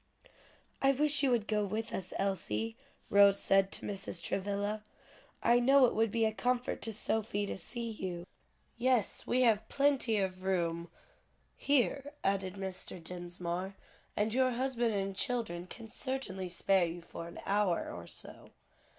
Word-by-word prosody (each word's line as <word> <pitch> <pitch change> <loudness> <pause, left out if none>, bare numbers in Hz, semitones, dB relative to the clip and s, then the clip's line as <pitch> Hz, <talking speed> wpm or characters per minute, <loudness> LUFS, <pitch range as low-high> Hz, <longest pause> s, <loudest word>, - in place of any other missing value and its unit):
"I 275 0 +5
wish 295 +1 +3
you 275 - +3
would 235 -4 +2
go 210 -1 +1
with 220 +3 -3
us, 185 -1 -3
Elsie," 200 +3 -1 0.4
Rose 200 0 +7
said 195 0 +3
to - - -2
Mrs. 195 -3 -3
Travilla. 205 +3 -2 0.6
"I 240 +1 +5
know 270 +2 +6
it 240 - +1
would 225 0 +2
be 225 +2 +2
a 220 - +1
comfort 245 +2 0
to 225 - -2
Sophie 215 -1 -1
to - - -4
see 230 +5 -5
you." 180 -5 -5 0.5
"Yes, 250 -4 +1
we 255 +1 +3
have 220 -2 +3
plenty 275 -5 +2
of 185 -2 -2
room 170 -3 0 0.7
here," 280 +1 +1
added 195 -1 0
Mr. 190 -1 -5
Dinsmore, 175 +2 -4 0.4
"and 215 +1 +1
your 255 0 +3
husband 240 -3 0
and 195 -1 -2
children 220 -8 -1
can 225 +4 -8
certainly 220 -6 -4
spare 185 +1 +3
you 170 +1 -6
for 165 0 -8
an 170 - -9
hour 200 -3 +1
or 85 0 -8
so." - - -10
205 Hz, 155 wpm, -33 LUFS, 190-240 Hz, 0.7 s, Rose